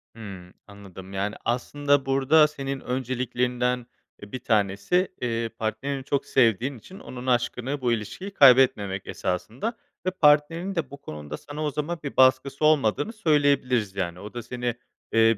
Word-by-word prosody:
Hımm. 95 -5 -10
Anladım, 100 -2 -12
yani, 100 +2 -2
aslında 145 +3 +1
burada 135 +3 +4
senin 140 -2 -5
önceliklerinden, 125 -1 -1 0.4
eee, 105 - -11
1 130 - -4
tanesi 110 - +1 0.5
partnerini, 110 +6 -2
eee, 135 - -7
çok 140 +1 -1
sevdiğin 125 +1 +2
için 185 - -13
onun 125 0 -8
aşkını, 125 +2 0
bu 125 -2 +1
ilişkiyi 115 - -4
kaybetmemek 125 - +5
esasında 120 - -3 0.3
ve 185 - +1
partnerin 165 +3 +3
de 160 -6 -2
bu 140 - -8
konuda 75 - -7
sana 150 +1 -7
o 150 - 0
zaman 150 +4 -3
bir 140 - -6
baskısı 130 +2 +4
olmadığını 150 - +2
söyleyebiliriz. 140 - +2
Yani, 90 -3 -3
o 105 +2 -9
da 120 -1 -5
seni, 120 -1 -3 0.4
eee 115 -1 +5
130 Hz, 150 wpm, -25 LUFS, 110-145 Hz, 0.5 s, kaybetmemek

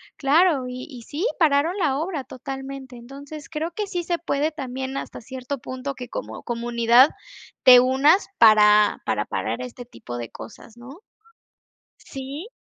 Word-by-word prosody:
claro, 295 0 +3
y 250 0 -7
y 250 -5 -10
sí, 300 - -4
pararon 315 +2 +3
la 300 -8 +1
obra 315 -2 -3
totalmente. 270 0 -8
Entonces, 280 +5 -10
creo 320 +2 -3
que 415 +3 -4
sí 355 -2 -3
se 345 0 -2
puede 300 -1 -1
también, 265 -3 -5
hasta - - -6
cierto 260 +4 -6
punto, 260 +2 -6
que 250 - -8
como - - -7
comunidad 235 +2 +3 0.5
te 250 -1 +9
unas 275 +9 +3
para 210 -2 +6
para - - -1
parar - - -3
este 250 0 -8
tipo 120 - -9
de 120 -2 -6
cosas, 225 +1 -12
¿no? 265 +8 -12 1.0
¿Sí? 275 +7 -8
270 Hz, 150 wpm, -23 LUFS, 245-300 Hz, 1.0 s, te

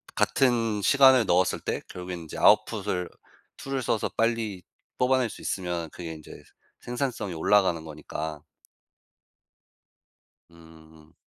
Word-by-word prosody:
같은 115 -5 +1
시간을 130 -2 +6
넣었을 90 0 +2
때 - - -3
결국엔 90 -1 -6
인제 80 - -9
아웃풋을 90 -1 +2 0.5
툴을 135 -1 -3
써서 115 -2 -1
빨리 115 -5 -1 0.3
뽑아낼 125 -1 +2
수 - - -10
있으면 85 -3 -3
그게 85 -2 -7
인제 80 -1 -12 0.4
생산성이 120 -6 -3
올라가는 85 0 +2
거니까. 75 0 -6 2.1
음. 80 -1 -18
90 Hz, 250 characters per minute, -26 LUFS, 80-115 Hz, 2.1 s, 시간을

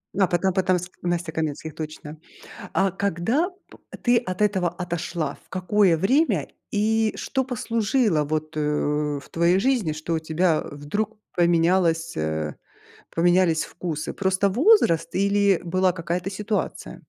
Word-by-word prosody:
А, 195 -1 +3
Потап 180 +1 0
Потап 185 -1 +2
с 180 - -7
Настей 175 -2 -2
Каменских, 155 -1 -3
точно. 155 -1 -7 0.6
А 195 0 +3
когда 200 - 0 0.2
п - - -15 0.2
ты 240 -1 +4
от 200 -4 -3
этого 190 -4 +2
отошла? 175 -2 -4
В - - -30
какое 185 -1 +2
время 265 - +2 0.2
и 220 +1 +1
что 265 -1 -1
послужило 230 - +1
вот, 155 +1 -3
э, - - 0 0.6
в - - -16
твоей 170 +2 +3
жизни, 220 - +1
что 155 +2 -3
у - - +1
тебя, 160 +1 +1
э, - - -8
вдруг 205 +10 -3 0.2
поменялось, 170 -1 +2
э, 80 -1 -2 0.6
поменялись 175 -1 +3
вкусы? 160 -4 -5
Просто 190 +1 +1
возраст 250 - +3
или 200 -1 +3
была 185 +2 +2
какая-то 175 +2 -3
ситуация? 210 +2 -3
180 Hz, 140 wpm, -24 LUFS, 165-205 Hz, 0.6 s, ты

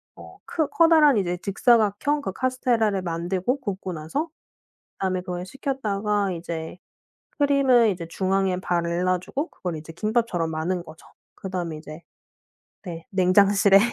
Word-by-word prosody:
어 - - -13
크 315 -3 -1
커다란 315 -6 +5
이제 180 -3 0
직사각형 225 +7 +2
그 190 - -4
카스테라를 235 -5 +1
만들고 180 +9 -1
굽고 190 -5 -4
나서 165 - -3 0.5
그 - - -9
다음에 185 -1 0
그걸 180 0 -5
식혔다가 210 -6 -1
이제 165 0 -6 0.6
크림을 275 -5 +4
이제 175 -3 -4
중앙에 190 +1 0
발라 175 +1 0
주고 285 - -4
그걸 180 -3 -5
이제 155 +1 -9
김밥처럼 215 -4 0
마는 170 +3 -2
거죠. 155 -1 -14 0.3
그 190 - -8
다음에 175 -4 -3
이제 155 +1 -10 0.8
네 165 -3 -8
냉장실에 195 +1 +5
190 Hz, 305 characters per minute, -24 LUFS, 175-235 Hz, 0.8 s, 커다란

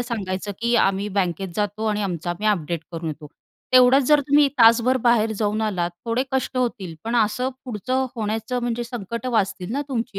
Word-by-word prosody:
सांगायचं 205 -4 -3
की, 235 +1 +1
"आम्ही 195 -1 +1
बँकेत 185 0 0
जातो 210 +1 -2
आणि 210 -1 0
आमचं 175 -2 -3
आम्ही 205 +5 -3
अपडेट 170 -5 -1
करून 165 -1 -4
येतो." 150 0 -7 0.5
तेवढंच 255 +2 +6
जर 295 -1 +6
तुम्ही 285 0 +5
तासभर 235 +3 +5
बाहेर 225 -2 +3
जाऊन 215 0 0
आलात, 180 -5 -1
थोडे 235 +2 0
कष्ट 265 -1 -1
होतील. 225 -9 -2
पण 230 +2 -1
असं 235 +3 +1 0.2
पुढचं 255 +3 -2
होण्याचं 225 +3 -2
म्हणजे 240 0 -2
संकटं 235 0 -5
वाचतील 195 -3 -1
ना 280 +3 -1
तुमची 235 -5 -3
220 Hz, 175 wpm, -22 LUFS, 195-245 Hz, 0.5 s, तेवढंच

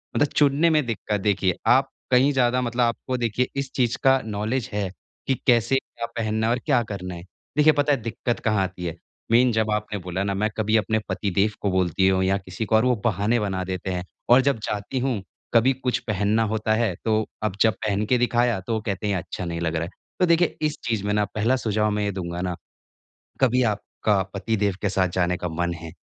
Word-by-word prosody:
मतलब 145 - +3
चुनने 150 +3 +4
में 155 -4 +2
दिक्कत 105 -3 -2
देखिए 95 -3 +1
आप 135 +2 +4 0.2
कहीं 130 +3 +5
ज़्यादा 125 -1 +2
मतलब 120 0 -1
आपको 120 +2 -1
देखिए 120 +1 0
इस 140 -1 -2
चीज़ 120 -3 +1
का 135 0 +5
नॉलेज 110 +3 -2
है, 100 -2 -1 0.4
कि 135 - +3
कैसे 120 +1 +4
क्या 120 -3 -3
पहनना 110 0 0
है - - +2
और 125 - -1
क्या 135 -6 +3
करना 90 -4 -6
है। 85 - -9 0.3
देखिए 150 +1 +6
पता 145 0 +2
है 135 - -1
दिक्कत 115 +2 -2
कहाँ 105 -3 +2
आती 90 -1 -5
है, 85 -1 -3 0.4
मीन 120 +2 +5
जब 110 -1 +1
आपने 105 0 -2
बोला 90 +1 -3
ना 100 - -1
मैं 105 +2 0
कभी 110 +1 +1
अपने 110 0 +1
पति 100 +2 -1
देव 100 +2 +3
को 100 - +1
बोलती 95 0 +2
हूँ 95 0 +3
या 95 +1 +2
किसी 95 +2 -5
को 110 - +1
और 110 - +4
वो 125 -1 +3
बहाने 110 +2 +2
बना 95 -3 -2
देते 95 0 -4
हैं 90 -1 -2 0.3
और 125 +2 +7
जब 135 -4 +1
जाती 105 +5 -3
हूँ, 125 -5 -1 0.3
कभी 120 +3 +5
कुछ 125 -1 -1
पहनना 105 +1 +1
होता 110 0 0
है, 110 -3 +1
तो 110 -1 +2 0.2
अब 105 -3 -1
जब 110 -1 +5
पहन 105 0 0
के 125 +4 +2
दिखाया, 120 -3 +2
तो 105 +5 -4
वो 110 - -1
कहते 100 -1 -3
हैं 100 - +1
अच्छा 90 0 -5
नहीं 85 0 -3
लग 85 -1 -1
रहा 80 - 0
है। 85 - -5 0.3
तो 185 - +5
देखिए 170 0 +3
इस 155 0 0
चीज़ 110 -4 0
में 105 - 0
ना 105 0 +2
पहला 110 +5 +2
सुझाव 110 -3 0
मैं 105 0 -1
ये 100 - 0
दूँगा 90 -2 -4
ना, 90 -1 -2 0.9
कभी 125 -1 +4
आपका 105 -1 0
पति 110 +3 -1
देव 100 -2 +1
के 105 - +1
साथ 95 -1 +2
जाने 90 -1 +1
का 90 - -3
मन 85 +2 -1
है, 85 -1 -8
110 Hz, 230 wpm, -24 LUFS, 95-125 Hz, 0.9 s, और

